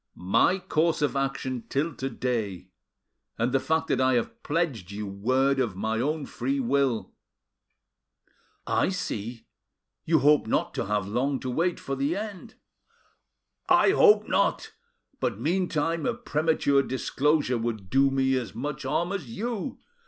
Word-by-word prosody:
"My 95 - +3
course 165 -3 0
of 145 -2 0
action 135 -2 -2
till 150 +4 0
to 135 - -2
day, 105 -9 -3 0.7
and 115 +2 0
the 135 - +3
fact 160 +3 0
that - - +2
I 130 0 +3
have 120 - -2
pledged 145 - -1
you 105 +1 -5
my 95 - -6
word 130 +7 +1
of 115 -7 0
my 110 +3 -1
own 150 +3 -1
free 275 - -2
will." 140 - 0 1.5
"I - - +1
see, 120 - -4 0.6
you 160 0 +3
hope 145 -2 +4
not - - 0
to - - -3
have 105 -2 0
long 130 +6 0
to 130 - -3
wait 170 +7 0
for 135 - -4
the 140 +5 0
end." 205 -2 -6 1.1
"I - - +6
hope 425 0 +5
not; - - +1 0.5
but - - -1
meantime 165 -1 0
a 240 - 0
premature 155 -9 +1
disclosure 135 0 0
would 110 -5 -4
do 135 +1 +4
me 135 0 +1
as 125 -3 -5
much 145 +3 -4
harm 170 +4 -1
as 195 -11 -4
you. 235 - -4
135 Hz, 150 wpm, -27 LUFS, 120-165 Hz, 1.5 s, I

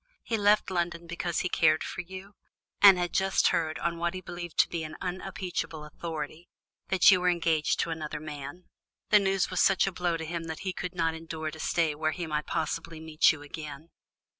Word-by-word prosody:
He 230 - -1
left 205 -2 +3
London 170 -1 -2
because 170 0 -2
he - - 0
cared 155 -3 +3
for - - -4
you, 190 +3 -10 0.5
and 195 -2 +9
had 175 -1 -2
just 190 0 +3
heard, 160 -1 0
on 170 0 -2
what 170 +1 -1
he 185 - -5
believed 175 -2 -8
to - - -1
be 170 -2 -4
unimpeachable 180 -1 -4
authority, 155 +1 -6 0.4
that 190 +1 +6
you 185 -1 +4
were 180 - +3
engaged 165 -3 +1
to - - -2
another 155 -2 -4
man. 150 +2 -8 0.5
The 210 - +8
news 195 -2 +1
was 185 - +1
such 195 - +4
a 195 - -1
blow 175 -2 -1
to 160 - -5
him 170 0 -4
that 160 -1 -6
he 190 -1 -3
could 180 0 -5
not 165 -2 +1
endure 160 -1 -5
to 160 - -11
stay 160 -1 +1
where 155 +1 -1
he 175 - -4
might 150 -1 -2
possibly 165 +1 -3
meet 160 -1 +4
you 145 -2 -7
again." 150 +1 -8
170 Hz, 205 wpm, -28 LUFS, 155-180 Hz, 0.5 s, and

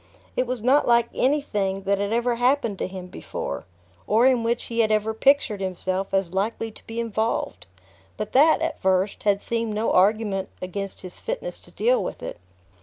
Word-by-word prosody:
It 255 - 0
was 250 -3 -3
not 270 +4 +4
like 235 -1 +4
anything 210 -9 0
that 200 0 +1
had 200 +1 -1
ever 235 +1 +1
happened 245 -4 +1
to - - -1
him 185 -1 -7
before, 180 - -6 0.4
or 225 +4 +4
in 255 -2 +4
which 235 +1 0
he 230 0 -4
had 220 -1 +3
ever 215 +1 +1
pictured 245 -4 +3
himself 185 0 -2
as 190 -2 0
likely 220 +3 -1
to - - -17
be 225 +1 -4
involved; 220 - -2 0.5
but 215 - -4
that, 310 +4 +5
at 325 -1 -3
first, 190 +1 +1
had 200 -1 +1
seemed 230 -2 -2
no 220 +2 0
argument 195 0 +2
against 195 +2 -5
his 180 -1 -10
fitness - - -4
to - - -11
deal - - +2
with - - -6
it. - - -6
220 Hz, 185 wpm, -24 LUFS, 195-240 Hz, 0.5 s, that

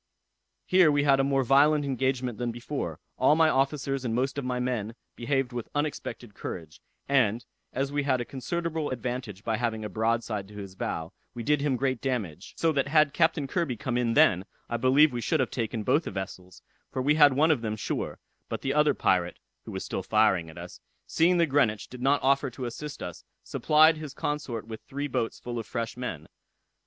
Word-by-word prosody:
Here 180 -4 +5
we 145 0 +2
had 140 -2 +4
a - - +4
more 135 -1 +2
violent 145 +3 +4
engagement 130 -3 -1
than 120 -1 -1
before: 120 +5 -5 0.2
all 130 +4 +5
my 160 0 +5
officers 135 -1 0
and 115 -2 -1
most 135 +3 0
of - - -4
my 125 0 -2
men 120 -3 -2 0.2
behaved 135 0 -1
with 120 -2 -5
unexpected 125 -6 -3
courage; 80 -6 -7 0.3
and, 120 -4 +2 0.3
as 135 +1 -2
we 145 0 0
had 140 -2 +1
a 120 - -3
considerable 160 +4 -3
advantage 125 -5 -4
by 110 -1 0
having 110 -3 -2
a - - -4
broadside 110 -2 -1
to 105 - -14
his 100 -2 -7
bow, 80 -3 -4 0.2
we 120 - -5
did 150 +3 +2
him 140 -2 +1
great 130 -1 -1
damage; 115 - -3
so 165 - +2
that 140 -2 0
had 155 -1 +4
Captain 160 -3 +2
Kirby 135 -4 -1
come 120 +4 -3
in 120 -2 +1
then, 95 -3 +5 0.3
I 120 - +1
believe 135 +4 +5
we 120 - -2
should 160 +6 +1
have 130 - 0
taken 115 -2 -2
both 145 +8 +2
the - - -3
vessels, 95 -2 -7 0.3
for - - -3
we 145 +3 +4
had 145 -2 +6
one 155 +4 +4
of 140 -7 +1
them 110 -2 -2
sure; 105 - -3 0.3
but - - -4
the 135 - -1
other 150 -1 +3
pirate 90 -2 +1 0.3
(who - - -7
was - - -5
still - - -3
firing 100 -6 +2
at 80 - -13
us,) 85 +1 -9 0.3
seeing 175 +2 +3
the 170 - +4
Greenwich 135 -8 +1
did 125 -1 -10
not 140 +2 +2
offer 140 +1 +3
to 125 +1 -6
assist 145 +5 -6
us, 90 -2 -7 0.2
supplied 155 +1 +4
his 150 -3 -8
consort 145 -7 -3
with 110 -1 -7
three 140 +2 -4
boats 115 -4 -2
full 120 -1 -5
of 115 - -6
fresh 115 -2 -3
men. 85 -11 -5
130 Hz, 210 wpm, -28 LUFS, 115-145 Hz, 0.3 s, had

